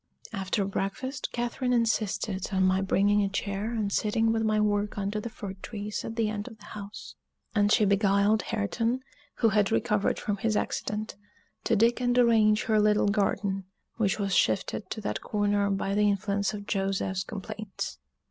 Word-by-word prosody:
After 195 0 -1
breakfast, 225 +8 -3
Catherine 245 +1 -1
insisted 215 -4 0
on 190 -1 +2
my 185 +1 +3
bringing 200 +2 +3
a 200 - +1
chair 200 +2 -2
and 215 -4 -1
sitting 225 +1 +2
with 225 0 +1
my 215 -1 +2
work 205 0 0
under 200 +1 -1
the 235 - -5
fir 200 -3 -7
trees 210 -1 -5
at 225 - -5
the 225 -2 +1
end 210 0 -3
of 225 -3 -10
the 205 - -16
house; 205 0 -8 0.4
and 205 -1 +3
she 215 - +5
beguiled 200 +1 +3
Hareton, 230 +4 -1 0.3
who 230 - +3
had 210 -1 +2
recovered 210 -3 +1
from 205 -1 -2
his 215 +1 0
accident, 210 0 -3 0.5
to 230 - +3
dig 235 +3 +3
and 245 0 +2
arrange 220 -3 +4
her 220 -1 +2
little 210 -1 +3
garden, 200 -1 0 0.3
which 210 -3 +1
was 200 -2 -1
shifted 195 +4 +1
to 215 - -4
that 205 - -3
corner 205 -1 +1
by 195 0 -1
the 210 0 +3
influence 200 0 0
of 205 -1 -7
Joseph's 195 -1 -1
complaints. 210 - -6
210 Hz, 175 wpm, -28 LUFS, 200-220 Hz, 0.5 s, she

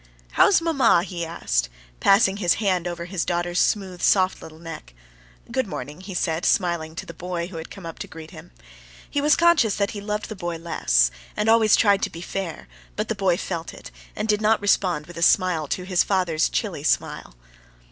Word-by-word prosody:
"How - - +5
is 380 - +4
mamma?" 280 - +3
he 175 -2 -5
asked, - - -1 0.3
passing 195 0 +4
his 175 -4 +2
hand 185 -5 0
over 170 -1 -5
his 180 -1 -2
daughter's 175 0 -1
smooth, 190 -4 0
soft 185 -1 +3
little 160 0 -11
neck. 160 - -10 0.6
"Good - - 0
morning," 145 +7 -7
he 190 -1 -8
said, 165 -1 -1
smiling 170 -3 0
to - - -6
the 170 - -9
boy, 175 +1 -4
who 175 - -8
had 160 - -7
come 195 - -11
up 165 - -8
to - - -6
greet 160 -1 -11
him. - - -12 0.6
He 285 - -1
was 300 +1 +4
conscious 335 -11 +4
that 200 -1 0
he 205 - -6
loved 210 +1 -3
the 215 - -6
boy 175 -3 -4
less, - - +2 0.3
and 210 - 0
always 225 -2 +5
tried 200 -2 +3
to - - 0
be 165 - -9
fair; 175 - -5 0.3
but - - -3
the - - +1
boy 190 -4 +1
felt 170 -3 -5
it, - - -11 0.2
and 215 - -3
did 210 -1 +1
not 220 +1 +3
respond 185 -6 +1
with 175 +1 -12
a - - -5
smile 170 -3 +3
to 180 - -3
his 180 -1 +2
father's 180 -5 +1
chilly - - -2
smile. - - -1
180 Hz, 210 wpm, -23 LUFS, 165-200 Hz, 0.6 s, How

